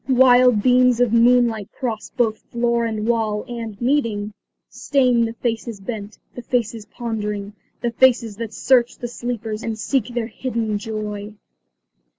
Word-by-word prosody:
Wild 250 -3 +5
beams 250 -1 +4
of 245 -2 +2
moonlight 235 -3 +3
cross 225 -4 -3
both 225 -3 +1
floor 235 0 +1
and 220 -1 -3
wall, 220 -2 0
and, 230 -4 -6
meeting, 230 -6 0 0.3
stain 250 -4 +2
the 225 - -4
faces 230 -2 -3
bent; 205 0 -6 0.2
the 245 - -7
faces 230 -3 -2
pondering; 210 -3 -4 0.3
the 240 - -1
faces 235 -3 +3
that 230 -1 -5
search 245 0 +2
the 240 - -5
sleepers 235 -2 -4
and 225 -1 -4
seek 240 +1 0
their 240 -2 -3
hidden 230 -3 -3
joy. 210 -1 -5
230 Hz, 145 wpm, -21 LUFS, 215-245 Hz, 0.3 s, Wild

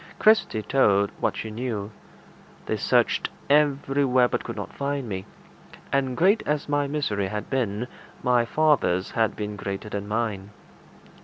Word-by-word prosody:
Kirsty 215 - +3
told 100 -5 +3
what - - 0
she 110 - -5
knew. 110 -3 -4 0.7
They - - -1
searched - - +2 0.2
everywhere, 140 -3 +3
but - - -2
could - - -6
not - - -6
find 140 -2 -2
me; 95 -3 -5 0.7
and 135 -2 +1
great 195 +6 +4
as 150 -1 0
my 145 -1 +1
misery 125 -10 -1
had 105 +2 -5
been, 120 -3 -1 0.4
my 125 -1 +3
father's 125 - +2
had 115 -2 +1
been 105 0 -4
greater 100 +1 -5
than 100 -1 -4
mine. 105 -3 -2
120 Hz, 145 wpm, -25 LUFS, 105-140 Hz, 0.7 s, great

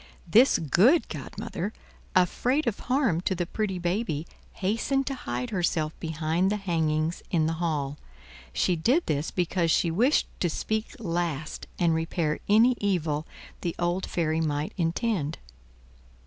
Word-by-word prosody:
This 235 +10 +6
good 200 - +4
godmother, 205 +5 -5 0.4
afraid 250 - +2
of 225 -3 -1
harm 250 - +2
to 190 - 0
the 175 0 -1
pretty 195 +1 -2
baby, 175 -3 -1 0.3
hastened 230 +8 0
to 275 - -2
hide 125 - -4
herself 165 -4 0
behind 160 +3 0
the - - +1
hangings 160 -4 0
in 165 -4 +2
the 160 - 0
hall. 150 -4 -1 0.5
She 175 - +1
did 250 - +2
this 150 +1 -1
because 175 -1 0
she 165 +1 +3
wished 245 - +3
to 175 - +1
speak 220 - -2
last 170 - -3
and 170 -2 +3
repair 160 -1 -1
any 230 +4 +6
evil 160 -6 0 0.3
the 170 - -2
old 175 +2 0
fairy 160 -1 0
might 150 -1 -1
intend. 170 -2 -1
175 Hz, 140 wpm, -27 LUFS, 160-210 Hz, 0.5 s, This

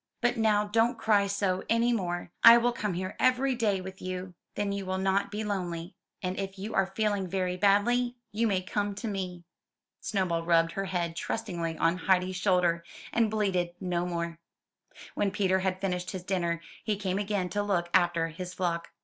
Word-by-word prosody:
"But 240 0 +2
now 215 -2 +3
don't 225 +3 +2
cry 205 -2 +3
so 195 -2 0
any 235 +1 +3
more; 175 -5 -2
I 230 0 +11
will 240 +1 +2
come 210 -5 -2
here 185 +2 -4
every 255 +1 +3
day 210 -6 +1
with 190 +1 -9
you, 185 0 -5 0.2
then 205 -1 -1
you 200 0 -3
will 185 0 -2
not 195 +1 +1
be 210 +2 -3
lonely; 180 -4 -3 0.3
and 185 +1 -2
if 195 0 -4
you 210 +4 -5
are 195 -1 +2
feel 210 +2 0
ing 195 -2 -2
very 180 0 -1
badly, 225 +6 +3 0.2
you 225 +2 +1
may 190 -3 0
come 205 +2 -2
to 215 +3 -5
me." 185 -4 -4 0.6
Snowball 185 -5 0
rubbed 165 0 +3
her 195 +2 -3
head 175 -3 -2
trustingly 170 -6 -3
on 165 +2 +2
Heidi's 185 0 +1
shoulder, 180 -3 +2 0.3
and 230 -2 +3
bleated 185 -5 0
no 180 -2 -1
more. 170 -1 -3 0.7
When 205 - +1
Peter 190 -1 +1
had 185 0 -1
finished 180 -2 -2
his 185 -2 -5
dinner, 170 -3 -1 0.2
he 215 -1 0
came 195 -1 -2
again 200 -2 -1
to 205 +4 -1
look 190 -4 0
after 175 -2 +3
his 180 +3 -7
flock. 170 -2 -1
190 Hz, 190 wpm, -29 LUFS, 180-205 Hz, 0.7 s, I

